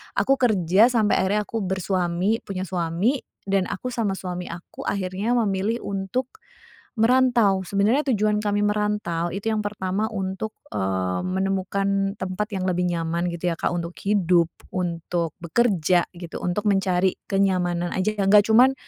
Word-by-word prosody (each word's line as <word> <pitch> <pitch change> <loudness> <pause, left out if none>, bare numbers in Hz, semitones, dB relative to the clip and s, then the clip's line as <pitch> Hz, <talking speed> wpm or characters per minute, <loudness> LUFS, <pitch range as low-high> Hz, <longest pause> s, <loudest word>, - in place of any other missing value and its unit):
aku 270 0 +2
kerja 205 -3 +4
sampai 225 -4 +2
akhirnya 200 +3 +1
aku 225 +2 -4
bersuami, 190 +1 0
punya 185 -2 -3
suami, 180 - 0 0.2
dan 195 -1 0
aku 250 +6 -4
sama 220 -5 -1
suami 180 -1 -5
aku 170 +1 -8
akhirnya 200 +4 -1
memilih 215 0 0
untuk 200 +6 -3 0.7
merantau. 230 -4 +4
Sebenarnya 205 +9 +2
tujuan 210 0 +2
kami 205 -1 0
merantau 210 -5 0
itu 200 +3 -2
yang 215 - 0
pertama 205 0 -2
untuk, 195 +1 -4 0.2
eee, 95 -2 -1
menemukan 195 +1 -1
tempat 190 +3 -3
yang 185 - -2
lebih 180 -1 +1
nyaman, 170 +1 -1
gitu, 170 0 -2
ya, - - -6
Kak, - - 0
untuk 170 0 -3
hidup, 180 -4 +2 0.2
untuk 170 -2 -2
bekerja, 180 -2 +2
gitu, 175 -1 -8
untuk 180 +4 -2
mencari 190 -2 +2
kenyamanan 180 -3 +1
aja, 210 +3 -1
yang 195 -1 +1
nggak 205 0 +7
cuman 250 +4 +6
195 Hz, 145 wpm, -24 LUFS, 180-210 Hz, 0.7 s, nggak